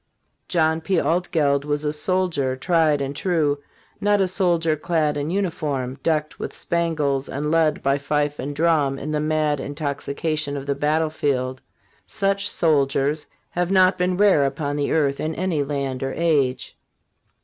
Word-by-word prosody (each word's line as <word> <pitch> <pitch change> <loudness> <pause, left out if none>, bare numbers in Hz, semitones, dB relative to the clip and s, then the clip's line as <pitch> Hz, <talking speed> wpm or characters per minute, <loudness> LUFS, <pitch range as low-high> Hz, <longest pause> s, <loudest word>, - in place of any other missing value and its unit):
John 160 -2 +1
P. 180 +1 +1
Altgeld 155 -5 +1
was 145 0 -2
a 150 - 0
soldier 160 -5 0
tried 155 +1 +2
and 140 +1 -3
true; 150 -4 +1 0.4
not 205 0 +2
a 190 - +3
soldier 175 -4 +2
clad 155 -1 0
in 145 +1 -2
uniform, 150 -9 -2
decked 155 -2 -1
with - - -5
spangles 155 -5 -1
and 150 +2 -2
led 160 -2 +2
by 140 +1 +2
fife 145 +1 -1
and 145 +2 -4
drum 150 -4 +2
in 150 +3 -5
the 150 - 0
mad 155 -1 0
intoxication 145 +1 -3
of 135 - -6
the 140 - 0
battlefield; 145 -3 0 0.5
such 200 -1 0
soldiers 145 -2 +1 0.2
have 175 0 -1
not 185 -1 +4
been 180 0 +1
rare 200 -8 +5
upon 145 +1 -2
the 145 -1 -1
earth 140 -3 +1
in 155 +1 -2
any 175 -5 0
land 140 -2 -3
or 135 0 -2
age. 140 -6 +1
150 Hz, 155 wpm, -22 LUFS, 140-170 Hz, 0.5 s, rare